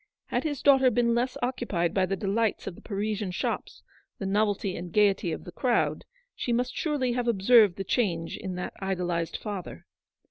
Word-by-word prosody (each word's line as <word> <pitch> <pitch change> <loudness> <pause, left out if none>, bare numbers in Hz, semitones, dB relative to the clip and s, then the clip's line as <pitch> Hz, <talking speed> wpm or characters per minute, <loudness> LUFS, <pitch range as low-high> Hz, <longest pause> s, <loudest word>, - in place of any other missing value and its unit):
Had - - 0
his 290 -4 -3
daughter 270 -2 +6
been 235 0 +2
less 245 +2 0
occupied 235 -9 -1
by 190 -1 +2
the 195 - -1
delights 205 +3 0
of - - -4
the - - -15
Parisian 210 -1 -2
shops, 180 - -3 0.3
the 195 - -5
novelty 200 -1 0
and 175 0 -6
gaiety 200 -3 +3
of 155 - -5
the 175 - -9
crowd, 240 +7 0 0.3
she 245 - -3
must 245 +2 0
surely 290 -6 0
have 240 0 -1
observed 215 -2 +5
the 195 - -4
change 180 -5 0
in 190 -3 -5
that 180 - -4
idolised 175 -3 -2
father. 190 - -6
205 Hz, 180 wpm, -27 LUFS, 185-240 Hz, 0.3 s, daughter